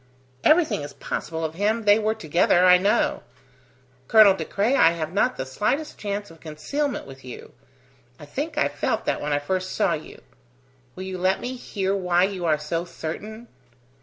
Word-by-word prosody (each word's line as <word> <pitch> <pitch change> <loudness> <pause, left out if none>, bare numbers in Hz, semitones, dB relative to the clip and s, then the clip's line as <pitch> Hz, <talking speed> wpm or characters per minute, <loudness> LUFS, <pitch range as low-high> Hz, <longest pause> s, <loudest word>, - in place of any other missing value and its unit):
Everything 310 - +3
is 145 -1 -7
possible 160 +3 -4
of 160 - -4
him: 215 +6 0
they 205 +1 +5
were 215 0 0
together, 175 0 +2
I 180 0 +7
know. 200 +3 +1 0.9
Colonel 215 -3 +7
De 190 - -4
Craye, 210 +6 0
I 165 -10 +5
have 160 0 -4
not 225 +5 +1
the 130 - -3
slightest 215 - -2
chance 205 -2 -4
of 165 - -16
concealment 245 - -3
with 135 0 -13
you. 125 -1 -10 0.7
I - - -10
think - - -5
I - - +3
felt - - -2
that - - -1
when 150 - -3
I 145 - +2
first 185 +6 -3
saw - - +2
you. - - -8 0.7
Will 185 - -7
you 190 -1 -5
let 185 +1 +1
me 250 - -4
hear 195 -5 -2
why 180 -2 +2
you 190 -2 -2
are 155 -2 +3
so 160 +3 -3
certain?" 215 +8 -7
185 Hz, 185 wpm, -24 LUFS, 160-215 Hz, 0.9 s, I